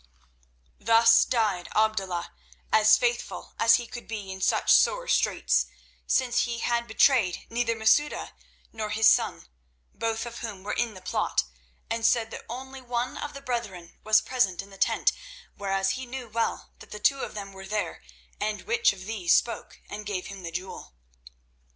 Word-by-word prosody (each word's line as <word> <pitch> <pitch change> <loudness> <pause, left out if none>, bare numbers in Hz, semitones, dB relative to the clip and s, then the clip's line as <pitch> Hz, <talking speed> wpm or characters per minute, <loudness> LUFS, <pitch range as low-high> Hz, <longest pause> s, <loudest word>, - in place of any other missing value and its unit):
Thus 230 +1 +6
died 210 -7 0
Abdullah, 195 -5 0 0.4
as 215 0 +6
faithful 240 -1 -2
as 230 0 +6
he 240 0 -2
could 240 +1 -9
be 210 -4 -6
in 190 0 -8
such - - +2
sore - - +3
straits, - - +2 0.4
since 250 -2 +2
he 235 -1 -3
had 235 0 -1
betrayed 220 -4 +3
neither 230 0 0
Masouda 225 +7 +2 0.4
nor 220 -1 -4
his 220 +1 +3
son, - - +2 0.5
both 225 0 -2
of 235 0 -7
whom 210 -5 -7
were 210 - -3
in 235 -4 -1
the 185 - -12
plot, - - 0 0.4
and 230 0 -3
said 225 -1 +2
that - - -8
only 265 +2 -7
one 245 0 -3
of 295 - -6
the 275 - -8
brethren 235 -10 -5
was 215 0 +5
present 220 -7 0
in 200 - -16
the 195 - -13
tent, - - +3 0.4
whereas 195 -1 0
he 260 0 -5
knew 250 0 -6
well 230 +1 -2
that - - -14
the 210 - -7
two 275 +6 +3
of - - -5
them 200 -1 -7
were 190 0 -10
there 210 -1 -3 0.4
and 210 0 -2
which 460 - +2
of 185 -1 -11
these 205 -5 +2
spoke 235 - -2
and 210 0 -7
gave 190 -3 -3
him 195 -1 -8
the 170 -2 -6
jewel. 180 - -7
225 Hz, 175 wpm, -27 LUFS, 200-240 Hz, 0.5 s, Thus